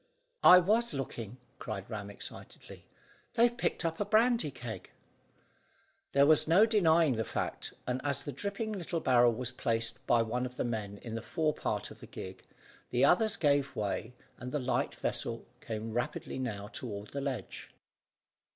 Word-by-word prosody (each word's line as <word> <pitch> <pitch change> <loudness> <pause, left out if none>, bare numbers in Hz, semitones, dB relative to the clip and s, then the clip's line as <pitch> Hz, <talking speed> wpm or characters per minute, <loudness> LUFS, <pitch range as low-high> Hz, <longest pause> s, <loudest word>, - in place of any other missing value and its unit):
"I 180 - +11
was 210 +1 +2
looking," 120 -4 -5 0.2
cried 100 -3 -5
Ram 105 -3 -5
excitedly; 100 - -10 0.5
"they've 235 +1 +4
picked 235 - -1
up 165 0 -1
a - - +2
brandy 225 -4 +3
keg." 120 -4 -7 1.2
There 140 0 +6
was 155 +1 +5
no 180 +7 +6
denying 165 - +4
the 110 - +1
fact; - - -3
and 125 +1 -2
as 145 -1 -1
the 145 - -4
dripping 200 - -3
little 175 -4 -3
barrel 120 -5 +5
was 125 +2 -3
placed 115 -2 -1
by 115 -1 +4
one 125 +3 -1
of 125 0 -13
the - - 0
men 105 -4 -3
in 115 - -6
the 115 - -3
fore 155 +4 0
part - - -3
of - - -12
the - - -11
gig, 95 0 -8 0.5
the 125 +3 +3
others 210 +7 +4
gave 140 -2 +2
way, 110 +3 -3 0.2
and 125 +1 -6
the 150 - 0
light 130 -2 -1
vessel - - -2
came 110 0 -5
rapidly 120 +2 -3
now 105 -6 -3
toward 105 -4 -6
the 140 - -3
ledge. 130 -8 -5
130 Hz, 170 wpm, -32 LUFS, 115-165 Hz, 1.2 s, I